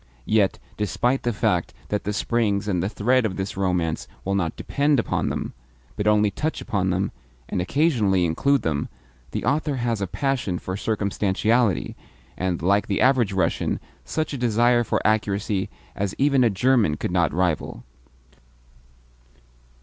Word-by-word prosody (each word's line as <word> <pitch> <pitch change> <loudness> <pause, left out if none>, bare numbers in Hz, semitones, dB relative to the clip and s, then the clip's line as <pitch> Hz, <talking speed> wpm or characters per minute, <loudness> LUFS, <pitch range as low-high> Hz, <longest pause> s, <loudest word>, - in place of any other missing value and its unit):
Yet, 105 -3 +2 0.2
despite 120 +6 0
the 120 - 0
fact 105 - 0
that 105 - -2
the 105 - 0
springs 105 -2 0
and 90 -4 0
the 95 - -1
thread 125 +4 +2
of 100 -4 -1
this 95 +1 -3
romance 90 -4 -1 0.2
will 100 - 0
not 90 -5 0
DEPEND 145 -1 +1
upon - - 0
them, - - -4 0.4
but 105 - -1
only 105 -1 +4
touch 155 +8 -2
upon 100 -5 -1
them, 95 +2 0 0.4
and 90 - -1
occasionally 105 - +2
include 140 - +2
them, 75 -3 -1 0.4
the - - -4
author 145 +2 +1
has 120 -4 -1
a 95 - -1
passion 130 -6 -1
for 95 +1 -5
circumstantiality, 105 +1 0 0.4
and, 90 -3 -2
like 100 +3 +2
the 100 - 0
average 125 -5 +3
Russian, 90 -4 0 0.2
such 155 -2 -2
a 140 - -4
desire 120 +1 +3
for - - 0
accuracy 100 -2 0 0.3
as 100 -1 -2
even 135 -2 +3
a 120 - +4
German 105 -6 +2
could - - -3
not 85 -4 +2
rival. 85 -7 -1
105 Hz, 155 wpm, -24 LUFS, 95-120 Hz, 0.4 s, only